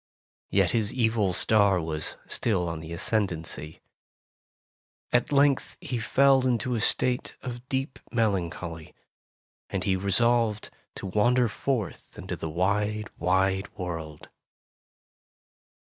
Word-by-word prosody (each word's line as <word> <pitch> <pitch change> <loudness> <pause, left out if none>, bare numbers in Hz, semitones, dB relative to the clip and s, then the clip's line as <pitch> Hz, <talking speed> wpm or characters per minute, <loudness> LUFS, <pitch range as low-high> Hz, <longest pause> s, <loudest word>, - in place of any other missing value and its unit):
Yet 100 -2 +3
his 110 -3 0
evil 110 -5 +1
star 100 0 +4
was 80 -2 -4
still 95 -6 0
in 80 - -6
the 80 +1 -9
ascend 100 +4 +1
ancy. 80 -1 -6 1.3
At 120 +2 +2
length 140 -1 +3
he 125 - -3
fell 135 +3 +4
into 125 0 0
a 115 - 0
state 125 +3 0
of 125 0 -7
deep 135 0 -2
melancholy, 85 -7 -2 0.7
and 95 - -2
he 95 0 +2
resolved 110 +3 +1 0.2
to - - -7
wander 120 +6 +3
forth 115 -3 -3
into - - -5
the 80 - -5
wide, 105 +5 0
wide 95 +3 +1
world. 80 -5 -6
105 Hz, 115 wpm, -27 LUFS, 90-120 Hz, 1.3 s, star